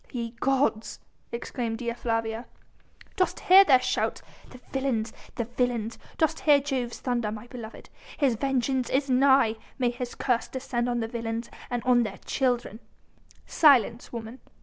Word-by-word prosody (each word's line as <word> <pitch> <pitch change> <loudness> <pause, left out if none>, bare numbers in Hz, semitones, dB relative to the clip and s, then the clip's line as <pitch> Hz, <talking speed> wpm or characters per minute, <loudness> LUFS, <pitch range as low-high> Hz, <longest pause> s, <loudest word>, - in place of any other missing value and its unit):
"Ye 235 -2 -4
gods!..." 260 -5 0 0.3
exclaimed 235 -1 -3
Dea 235 -1 -3
Flavia. 225 0 -2 0.7
"Dost 370 - +1
hear 380 +2 +8
their 265 -9 +5
shouts? - - -1 0.3
the 255 - -13
villains! 250 -5 -1 0.2
the 235 - -1
villains! 235 -1 -2 0.2
Dost 320 0 +1
hear 295 -2 +5
Jove's 260 -4 -3
thunder, 240 -4 -1
my 215 +1 -7
beloved? 235 -2 -10 0.3
His 275 -5 +3
vengeance 260 +1 0
is 270 0 0
nigh! 260 -3 +4 0.2
May 250 -3 +1
his 245 0 -6
curse 245 -3 0
descend 245 -2 -2
on 240 -1 0
the 225 - -2
villains 230 0 -4 0.2
and 245 -1 -2
on 250 -1 +4
their 210 -4 -3
children." 245 -4 -1 0.7
"Silence, 245 -6 +4
woman!" 230 +2 -7
245 Hz, 150 wpm, -27 LUFS, 230-265 Hz, 0.7 s, hear